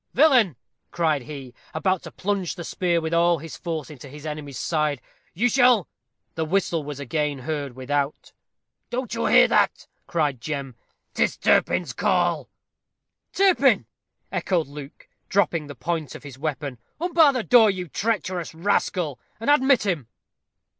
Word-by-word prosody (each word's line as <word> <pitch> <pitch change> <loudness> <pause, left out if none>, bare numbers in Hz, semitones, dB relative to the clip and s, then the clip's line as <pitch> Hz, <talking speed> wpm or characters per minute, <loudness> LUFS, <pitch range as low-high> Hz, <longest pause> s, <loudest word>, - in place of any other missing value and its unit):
"Villain!" 250 - +5 0.3
cried 160 -4 +1
he, 135 -2 -9 0.2
about 185 +3 +1
to - - -10
plunge 195 -3 -2
the 175 - -6
spear 170 +1 0
with 160 0 -3
all 170 0 +4
his 160 +1 -8
force 160 -3 -5
into 140 -1 -11
his 150 +2 -11
enemy's 150 -3 -6
side, 150 -1 0 0.4
"you 230 +8 +2
shall 245 -5 +4 0.2
" - - -52
The 160 - -2
whistle 170 -1 0
was 145 -1 -6
again 145 +1 -1
heard 140 -1 -4
without. 140 +2 -2 0.6
"Don't 250 -1 -3
you - - 0
hear - - +7
that?" - - +2 0.2
cried 145 -7 0
Jem: 140 -4 -4 0.4
"'Tis - - +1
Turpin's - - +2
call." - - +1 0.8
"Turpin!" 390 -2 +4 0.5
echoed 175 -4 0
Luke, 145 0 -11 0.2
dropping 170 -6 +1
the 145 - -8
point 155 +2 -3
of - - -10
his 135 -3 -10
weapon. 145 -4 -4 0.2
"Unbar 330 -3 +5
the 255 -4 -2
door, 230 -3 +6
you 185 -2 -3
treacherous 185 -3 -2
rascal, 170 -4 0 0.2
and 230 +6 +2
admit 265 -5 +4
him." 165 - -1
160 Hz, 150 wpm, -24 LUFS, 145-195 Hz, 0.8 s, hear